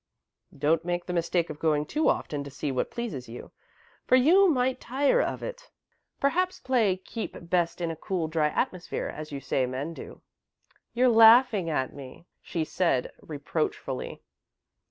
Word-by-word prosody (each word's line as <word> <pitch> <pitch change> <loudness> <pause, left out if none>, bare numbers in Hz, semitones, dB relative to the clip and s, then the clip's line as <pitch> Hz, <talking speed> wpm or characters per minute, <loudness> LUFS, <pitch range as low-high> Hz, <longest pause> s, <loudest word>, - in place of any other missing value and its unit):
"Don't 155 +3 +2
make 175 0 -2
the 180 - -4
mistake 170 -1 0
of 150 - -9
going 150 -2 +1
too 310 - +1
often 145 -1 -1
to 140 - -8
see 140 +1 -4
what 130 - -1
pleases 160 - -5
you, 120 - -9 0.6
for - - +5
you 355 +10 +6
might 260 -3 +1
tire 280 - +2
of - - -3
it. - - -7 0.5
Perhaps 365 +6 +1
plays 225 -8 +1
'keep 225 - -5 0.2
best 175 -2 +1
in 170 -1 -1
a - - -5
cool, 170 0 -3
dry 155 -1 +1
atmosphere,' 175 +3 -3
as 155 0 -7
you 140 - -4
say 130 -1 0
men 135 +6 -4
do." - - -11 0.7
"You're 250 +2 +4
laughing 225 -4 +6
at 130 -5 -1
me," 140 +3 -11 0.2
she 165 -2 -3
said, 155 -8 0
reproachfully. 145 -3 -4
170 Hz, 160 wpm, -27 LUFS, 150-245 Hz, 0.7 s, you